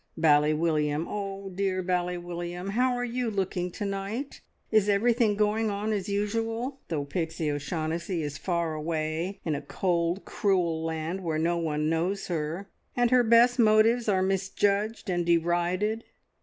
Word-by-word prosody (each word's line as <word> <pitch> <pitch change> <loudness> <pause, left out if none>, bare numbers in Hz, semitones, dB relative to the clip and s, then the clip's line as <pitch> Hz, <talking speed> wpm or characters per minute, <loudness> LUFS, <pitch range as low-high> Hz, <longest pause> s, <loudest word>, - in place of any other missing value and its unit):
Bally 150 -2 +4
William, 155 -1 +1
oh, 195 -1 -5
dear 185 0 -1
Bally 180 0 0
William, 175 +1 -5
how 250 +4 +2
are 245 0 -1
you 245 0 -2
looking 190 -3 -1
to 205 - -4
night? 200 +7 -4 0.3
Is 215 -2 +4
everything 225 +1 +3
going 215 +1 +1
on 210 +2 -1
as 200 -1 -2
usual, 225 +6 -2
though 150 -4 -2
Pixie 160 0 -2
O'Shaughnessy 160 +3 -2
is 145 -1 -4
far 170 -3 -1
away 160 +4 -2
in 160 - 0
a 145 - -2
cold, 170 +3 -1
cruel 175 -6 0
land 165 +3 -3
where 160 -2 -1
no 170 +2 +1
one 150 -2 -1
knows 175 +6 -1
her, 165 +3 -3 0.3
and 245 0 +3
her 250 0 +6
best 235 +2 +5
motives 225 +1 +4
are 190 -2 +3
misjudged 200 +3 0
and 175 -2 0
derided? 175 +6 +1
185 Hz, 155 wpm, -28 LUFS, 165-210 Hz, 0.3 s, her